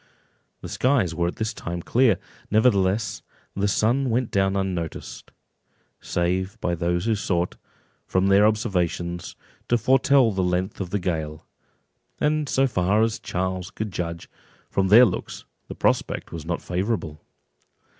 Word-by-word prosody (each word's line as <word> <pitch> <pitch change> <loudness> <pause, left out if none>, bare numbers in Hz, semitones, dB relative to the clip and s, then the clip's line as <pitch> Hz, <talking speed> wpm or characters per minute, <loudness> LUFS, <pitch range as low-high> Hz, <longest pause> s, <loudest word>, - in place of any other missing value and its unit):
The - - -7
skies 125 - +1
were 85 +1 0
at 85 - -4
this 110 -1 -2
time 85 0 -5
clear; 120 -6 +3 0.3
nevertheless 105 -2 +2 0.3
the 100 +1 +1
sun 120 +6 +1
went 120 +1 0
down 95 0 +1
unnoticed, 90 -4 -4 0.7
save 90 +2 -1
by 90 - -1
those 85 +2 -1
who 115 - +2
sought, 90 -4 -1 0.5
from 95 +1 +1
their 100 +2 +5
observations, 90 -5 -1 0.3
to 120 - +4
foretell 130 +1 +4
the 95 -1 -1
length 90 +3 -1
of 90 - -4
the 105 - 0
gale; 80 -4 -3 0.7
and 150 -1 +1
so 135 - +3
far 105 -2 +2
as 115 -1 0
Charles 95 0 -3
could 105 0 -5
judge, 85 -1 -4 0.4
from 95 -1 +1
their 115 +6 +8
looks, - - -4 0.2
the - - -7
prospect - - 0
was 80 -1 -7
not 85 -1 -2
favourable. 90 -4 -2
95 Hz, 145 wpm, -24 LUFS, 90-110 Hz, 0.7 s, their